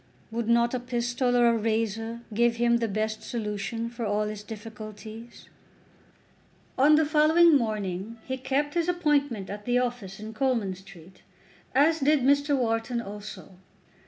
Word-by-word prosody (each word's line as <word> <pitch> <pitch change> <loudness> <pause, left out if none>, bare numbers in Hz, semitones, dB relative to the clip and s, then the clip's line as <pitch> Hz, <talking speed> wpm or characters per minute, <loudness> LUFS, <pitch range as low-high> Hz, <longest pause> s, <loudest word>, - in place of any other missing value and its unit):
Would 230 0 -3
not 235 +1 +3
a 255 - 0
pistol 245 0 0
or 240 - +5
a 235 - +4
razor 225 +1 -1
give 235 +2 +3
him 235 0 +3
the 230 -1 -1
best 215 +1 -2
solution 215 0 -3
for 235 0 -6
all 210 0 0
his 210 -1 -5
difficulties? 220 +1 -10 1.3
On 290 +3 +6
the 315 +1 +4
following 310 +2 +5
morning 215 -3 -2
he 260 - -2
kept 285 +3 -1
his 340 0 0
appointment 290 - +1
at 205 +1 -7
the 245 0 +2
office 240 -6 -3
in 215 +1 -7
Coleman 230 -5 0
Street, 185 -1 -15 0.5
as 315 +4 +4
did 295 0 +3
Mr. 285 +2 +3
Wharton 230 0 0
also. 205 -4 -8
230 Hz, 150 wpm, -27 LUFS, 215-260 Hz, 1.3 s, On